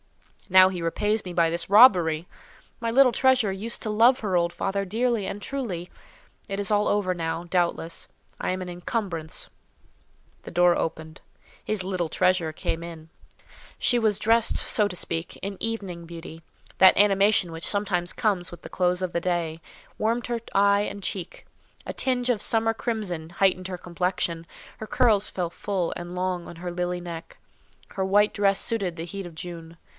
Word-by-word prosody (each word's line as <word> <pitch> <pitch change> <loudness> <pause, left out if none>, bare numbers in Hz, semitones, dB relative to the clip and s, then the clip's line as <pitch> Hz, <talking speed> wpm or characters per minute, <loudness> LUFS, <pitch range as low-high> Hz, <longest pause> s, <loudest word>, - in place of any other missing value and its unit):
Now 185 0 +8
he 180 -2 -5
repays 210 +6 0
me 180 - -6
by 170 -1 +2
this 170 +2 -2
robbery! 180 -7 +6 0.5
My 230 -1 -1
little 260 +1 +6
treasure 255 -6 +3
used 220 +5 -4
to 220 - -3
love 230 +4 +5
her 200 -4 -1
old 170 0 +2
father 195 +3 -2
dearly 225 +1 0
and 205 +2 -5
truly. 200 -10 -4 0.6
It 195 0 -3
is 205 +1 -1
all 210 0 +3
over 200 -3 +1
now, 165 0 -3
doubtless—I 170 -2 -2
am 185 0 -2
an - - -8
incumbrance." 175 -2 -4 0.9
The - - -10
door 175 0 +4
opened—his 165 +5 -5
"little 180 -3 -2
treasure" 185 -2 +1
came 165 +2 -3
in. 165 -2 -9 0.7
She 245 - +2
was 215 -3 +2
dressed, 230 +1 +3
so 210 -2 +1
to 180 - -6
speak, 165 -1 -3
in 200 0 -5
evening 195 -7 -4
beauty; 165 -1 -10 0.4
that 190 - +7
animation 200 -2 +4
which 165 0 -5
sometimes 190 -4 0
comes 185 -5 0
with 175 - -11
the - - -8
close 180 0 0
of 180 - -3
day, 170 -2 -1 0.4
warmed 230 +2 0
her 235 -1 -2
eye 200 0 +4
and 200 -1 -4
cheek; 185 -2 -5 0.4
a - - -5
tinge 255 -2 0
of 230 -5 +1
summer 225 0 +2
crimson 205 -9 -4
heightened 185 +1 +1
her 180 - -4
complexion; 175 -1 -2 0.3
her 220 - -6
curls 215 -5 +3
fell 175 -3 -3
full 185 -2 -2
and 175 +1 -7
long 180 -1 -2
on 170 - -10
her 175 +1 -5
lily 180 0 -2
neck; 170 -2 -8 0.5
her 190 - -2
white 205 +2 +3
dress 200 -1 +3
suited 195 -7 0
the 165 - -4
heat 195 +1 -6
of 170 - -13
June. 165 -1 -8
185 Hz, 170 wpm, -25 LUFS, 170-210 Hz, 0.9 s, Now